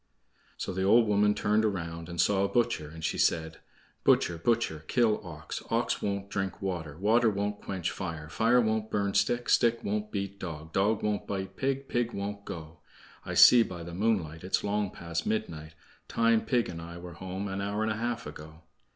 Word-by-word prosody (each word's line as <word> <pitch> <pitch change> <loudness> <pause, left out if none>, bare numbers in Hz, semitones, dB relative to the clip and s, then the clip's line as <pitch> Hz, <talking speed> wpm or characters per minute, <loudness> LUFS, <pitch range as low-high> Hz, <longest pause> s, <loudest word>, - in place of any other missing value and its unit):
So - - -4
the 95 - -2
old 115 +5 +5
woman 105 0 +3
turned 105 +1 +2
around 85 -5 -3
and 85 -1 -6
saw 100 -1 +3
a - - +2
butcher, 120 -11 0
and 80 +1 -10
she - - -1
said: 80 -1 +1 0.4
"Butcher, 85 -2 +3
butcher, 100 -6 0
kill 115 -4 +2
ox; 80 -4 -7
Ox - - 0
won't 100 -1 -2
drink 95 -1 -3
water; 85 -6 -4
Water 110 +5 +4
won't 105 0 -2
quench 95 -3 -3
fire; 80 -5 -5
Fire 115 +10 +3
won't 110 -1 0
burn 100 -1 0
stick; 120 +4 +1
Stick 115 0 +3
won't 105 +1 -2
beat 100 -1 -4
dog; 80 -3 -7
Dog 105 +2 +2
won't 105 -1 -1
bite 95 -1 -4
pig; 135 0 -1
Pig 120 -1 -1
won't 100 0 -5
go. 80 -1 -8 0.5
I - - -3
see 125 - +9
by 90 -6 -3
the 85 0 -8
moonlight 90 -5 0
It's 95 - 0
long 105 -1 0
past 85 -1 -4
midnight; 80 -8 -3 0.3
Time 115 -1 +2
pig 120 -3 +1
and 85 -2 -6
I 85 +1 -8
were 85 0 -9
home 95 +3 -5
an 95 0 -3
hour 100 +2 -1
and 110 - 0
a - - -1
half 120 +1 -2
ago." 75 +2 -10
100 Hz, 195 wpm, -29 LUFS, 85-110 Hz, 0.5 s, see